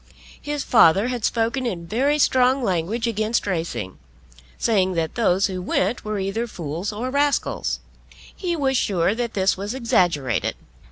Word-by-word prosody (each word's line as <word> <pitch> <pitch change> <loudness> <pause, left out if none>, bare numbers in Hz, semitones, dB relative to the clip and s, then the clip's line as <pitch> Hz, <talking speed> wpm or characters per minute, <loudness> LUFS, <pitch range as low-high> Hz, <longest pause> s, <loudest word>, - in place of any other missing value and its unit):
His 290 -1 -3
father 210 0 +5
had 245 -3 -3
spoken 235 +3 0
in 175 -7 -4
very 265 - +1
strong 260 -2 +3
language 195 +4 -1
against 220 0 0
racing, 160 - -3 0.6
saying 190 -5 +2
that 165 -2 -1
those 195 -4 +2
who 185 -2 -3
went 190 +5 0
were 215 0 -3
either 195 +5 -2
fools 170 0 -4
or 235 +5 -4
rascals. 285 +1 0 0.6
He 350 -3 -2
was 270 -4 0
sure 190 -5 +1
that 235 0 -3
this 190 -1 +2
was 205 +5 -4
exaggerated. 175 - +1
215 Hz, 150 wpm, -22 LUFS, 185-245 Hz, 0.6 s, father